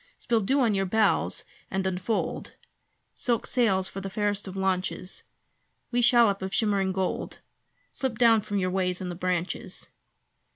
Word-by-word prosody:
Spill 230 -2 +1
dew 270 +8 +2
on 230 -4 +3
your 195 -1 0
bows 220 +3 +1 0.2
and 190 0 -1
unfold 190 +4 -2 0.6
Silk 235 -3 -1
sails 195 -7 +2
for 195 - -6
the 195 - -5
fairest 205 0 -1
of 190 0 -7
launches! 185 -1 -2 0.7
Wee 245 0 +2
shallop 235 -5 +5
of 190 0 -3
shimmering 200 -3 +2
gold; 190 -1 -2 0.5
Slip 260 -4 -3
down 230 -2 +5
from 205 -1 -3
your 185 -1 0
ways 180 -1 0
in 185 - -4
the - - -3
branches. 180 0 -3
195 Hz, 155 wpm, -27 LUFS, 185-225 Hz, 0.7 s, shallop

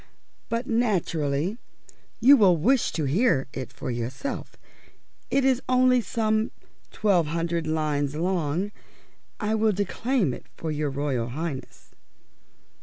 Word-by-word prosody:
But 230 +1 -1
naturally 185 - 0 0.6
you 265 +5 +8
will 195 -8 +5
wish 245 - +2
to 160 - -1
hear 150 - +2
it 130 - -5
for 125 - -5
yourself. 120 - -4 0.7
It 275 -1 +2
is 260 -1 +3
only 255 -1 +4
some 220 +1 0 0.4
twelve 190 -7 +2
hundred 165 +1 -1
lines 150 -2 0
long. 175 +2 -1 0.7
I 215 -1 0
will 220 0 +3
declaim 205 - 0
it - - -10
to 160 - -4
your 150 -1 -1
Royal 135 -4 -1
Highness." 145 +1 -6
175 Hz, 120 wpm, -26 LUFS, 150-225 Hz, 0.7 s, you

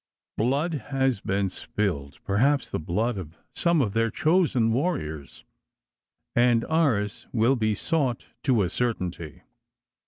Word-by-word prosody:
Blood 140 +6 0
has 135 -6 +1
been 95 0 0
spilled 90 -7 -3
perhaps 135 +9 +2
the - - -1
blood 105 +7 -1
of 80 -2 -9 0.2
some 170 -3 +2
of 100 -4 -2
their 115 0 +2
chosen 155 - +2
warriors 80 - -3 0.9
and 120 -1 +4
ours 125 -11 0
will 120 +3 +3
be 110 -3 +1
sought 140 - -1
to 125 -7 +3
a 90 - -1
certainty. 90 -10 -3
115 Hz, 125 wpm, -26 LUFS, 100-135 Hz, 0.9 s, and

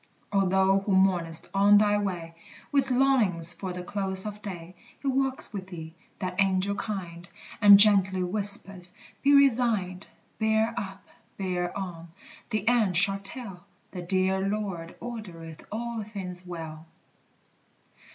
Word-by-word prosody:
O 195 -1 +2
thou 190 +1 +3
who 195 0 -2
mournest 175 -4 +1
on 200 +1 +5
thy 205 0 +3
way, 175 -5 -4 0.4
With 275 -2 +1
longings 230 -11 +2
for 190 -2 -6
the 180 0 -6
close 190 0 -3
of 210 0 -7
day; 180 -4 -8 0.3
He 280 - -6
walks 265 -2 0
with 190 -2 -6
thee, 160 -3 -9 0.2
that 185 +1 -2
Angel 195 +1 +1
kind, 180 -5 -6 0.3
And 205 -1 +9
gently 195 -3 +5
whispers, 195 -1 +3 0.3
"Be 280 - +3
resigned: 225 -9 +2 0.3
Bear 220 +1 +1
up, 195 -2 -7 0.3
bear 180 -2 -3
on, 175 -4 -6 0.4
the 215 -2 -2
end 220 -7 +3
shall 195 +2 +4
tell 195 -2 -7 0.3
The 180 - -6
dear 190 +1 +1
Lord 195 -4 -4
ordereth 180 -10 -9
all 235 +1 -4
things 185 -4 -8
well!" 160 -2 -8
195 Hz, 135 wpm, -27 LUFS, 180-210 Hz, 0.4 s, And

